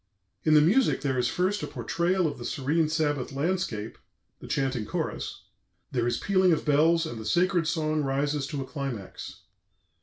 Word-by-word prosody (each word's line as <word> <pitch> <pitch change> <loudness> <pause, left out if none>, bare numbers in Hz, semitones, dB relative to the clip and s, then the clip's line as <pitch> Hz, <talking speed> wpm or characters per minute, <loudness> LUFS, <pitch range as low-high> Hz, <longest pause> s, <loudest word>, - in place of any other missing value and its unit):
" 95 - -49
In 155 -1 +5
the 150 - +8
music 220 - +3
there 130 -4 0
is 120 - +2
first 185 +8 0
a - - -3
portrayal 180 +2 0
of 155 - -2
the - - -6
serene 150 +3 0
Sabbath 145 -4 0
landscape, 140 - -2 0.4
the - - -10
chanting 135 -4 -1
chorus; - - -4 0.5
there 120 -2 0
is 120 - 0
pealing 185 -2 +3
of 160 - +1
bells, 160 +3 +4
and 120 -8 -6
the - - -6
sacred 175 - +2
song 155 -2 0
rises 140 +1 -1
to 145 -2 -4
a - - -4
climax. 130 -9 -6
150 Hz, 180 wpm, -27 LUFS, 135-170 Hz, 0.5 s, the